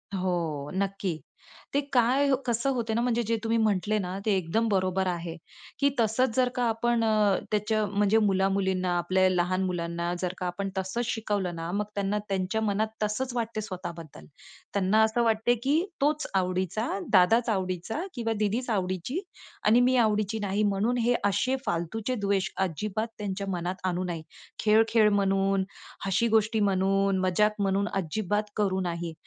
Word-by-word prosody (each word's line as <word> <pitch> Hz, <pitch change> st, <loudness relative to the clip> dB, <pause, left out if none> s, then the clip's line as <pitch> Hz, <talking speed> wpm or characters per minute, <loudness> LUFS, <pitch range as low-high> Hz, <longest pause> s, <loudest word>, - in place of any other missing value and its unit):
हो, 170 Hz, -6 st, -2 dB
नक्की. 195 Hz, -3 st, -2 dB, 0.5 s
ते 280 Hz, -, +3 dB
काय 255 Hz, +4 st, +3 dB, 0.2 s
कसं 235 Hz, +3 st, 0 dB
होत 235 Hz, -2 st, -3 dB
ना 235 Hz, -, +1 dB
म्हणजे 240 Hz, -1 st, +1 dB
जे 230 Hz, +1 st, 0 dB
तुम्ही 225 Hz, +1 st, +1 dB
म्हटले 215 Hz, -1 st, +1 dB
ना 185 Hz, 0 st, -4 dB
ते 210 Hz, -3 st, +3 dB
एकदम 190 Hz, +6 st, 0 dB
बरोबर 190 Hz, -1 st, +1 dB
आहे, 170 Hz, -2 st, -3 dB, 0.4 s
की 280 Hz, -, +4 dB
तसंच 225 Hz, +2 st, +2 dB
जर 255 Hz, -1 st, +3 dB
का 245 Hz, -, 0 dB
आपण 230 Hz, +1 st, +1 dB
अ, 215 Hz, -3 st, +3 dB
त्याच्या 215 Hz, 0 st, +1 dB
म्हणजे 205 Hz, +1 st, +2 dB
मुला-मुलींना, 190 Hz, -2 st, +1 dB
आपल्या 185 Hz, +2 st, +2 dB
लहान 185 Hz, +1 st, +1 dB
मुलांना, 170 Hz, -1 st, -2 dB
जर 180 Hz, -1 st, -1 dB
का 180 Hz, -, -4 dB
आपण 195 Hz, +2 st, -3 dB
तसंच 190 Hz, +6 st, -2 dB
शिकवलं 205 Hz, -6 st, -2 dB
ना, 165 Hz, +1 st, -4 dB
मग 205 Hz, +2 st, -1 dB
त्यांना 200 Hz, +1 st, 0 dB
त्यांच्या 195 Hz, +3 st, -1 dB
मनात 215 Hz, 0 st, +1 dB, 0.2 s
तसंच 240 Hz, +5 st, -2 dB
वाटते 225 Hz, -2 st, -2 dB
स्वतः 185 Hz, -4 st, -5 dB
बद्दल. 160 Hz, -3 st, -11 dB, 0.5 s
त्यांना 200 Hz, +2 st, +3 dB
असं 220 Hz, +2 st, +2 dB
वाटते 225 Hz, +2 st, +2 dB
की 280 Hz, +3 st, +2 dB, 0.3 s
"तोच 300 Hz, +2 st, +1 dB
आवडीचा, 185 Hz, +4 st, 0 dB, 0.2 s
दादाच 225 Hz, +5 st, +5 dB
आवडीचा 185 Hz, -, -2 dB
किंवा 225 Hz, -2 st, -1 dB
दीदीच 220 Hz, +4 st, 0 dB
आवडीची 190 Hz, -, -1 dB, 0.5 s
आणि 220 Hz, +3 st, +6 dB
मी 255 Hz, +1 st, +3 dB
आवडीची 215 Hz, 0 st, 0 dB
नाही." 205 Hz, 0 st, 0 dB
म्हणून 210 Hz, +4 st, +1 dB
हे 240 Hz, +1 st, +2 dB
असे 205 Hz, +6 st, +1 dB
फालतूचे 205 Hz, +6 st, -2 dB
द्वेष 195 Hz, -1 st, +1 dB, 0.2 s
अजिबात 215 Hz, +6 st, -3 dB
त्यांच्या 200 Hz, -1 st, -4 dB
मनात 180 Hz, +1 st, -3 dB
आणू 180 Hz, 0 st, -1 dB
नाही. 170 Hz, -3 st, -4 dB, 0.4 s
खेळ-खेळ 220 Hz, 0 st, +4 dB
म्हणून, 195 Hz, -1 st, +2 dB, 0.4 s
हशी 195 Hz, +5 st, +2 dB
गोष्टी 220 Hz, 0 st, +2 dB
म्हणून, 195 Hz, 0 st, +2 dB
मजाक 210 Hz, +3 st, +2 dB
म्हणून 195 Hz, +1 st, +1 dB
अजिबात 200 Hz, +3 st, -1 dB
करू 195 Hz, -3 st, +1 dB
नाही. 170 Hz, -1 st, -3 dB
200 Hz, 160 wpm, -27 LUFS, 185-225 Hz, 0.5 s, आणि